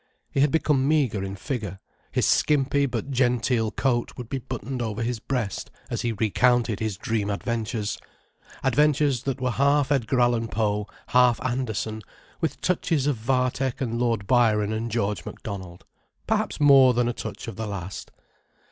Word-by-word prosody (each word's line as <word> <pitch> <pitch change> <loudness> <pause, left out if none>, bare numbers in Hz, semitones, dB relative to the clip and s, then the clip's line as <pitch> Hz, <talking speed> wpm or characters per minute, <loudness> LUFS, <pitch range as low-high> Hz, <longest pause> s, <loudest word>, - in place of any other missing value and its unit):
He - - -1
had 145 +2 +5
become 145 -3 +2
meagre 135 -10 +2
in 95 0 -4
figure, 100 -1 -4 0.3
his - - +1
skimpy 140 -1 +2
but 125 +2 -4
genteel 125 -3 +1
coat 120 0 0
would 120 -2 -7
be 135 - -2
buttoned 130 +1 -5
over 110 -1 -2
his 120 0 -2
breast, 115 -5 -3 0.2
as - - -1
he 120 - 0
recounted 115 +1 +2
his 110 -4 -2
dream 110 -1 -1
adventures, 110 0 -2 0.6
adventures 140 -1 +3
that 135 -1 -2
were 125 -1 0
half 140 +2 +2
Edgar 130 -2 +1
Allan 120 -1 +2
Poe, 105 -2 -1 0.2
half 125 -1 +4
Andersen, 110 -4 -2 0.4
with 160 -5 -2
touches 165 -5 +1
of 145 -2 +2
Vathek 125 +2 0
and 115 -4 -2
Lord 115 -4 0
Byron 110 -3 +3
and 115 +2 -2
George 105 -3 -1
Macdonald: 95 -4 -8 0.4
perhaps - - -1
more 135 -4 +7
than 120 0 +2
a 120 - 0
touch - - -7
of 115 - -6
the 110 +1 -4
last. 95 -2 -6
120 Hz, 160 wpm, -25 LUFS, 110-135 Hz, 0.6 s, more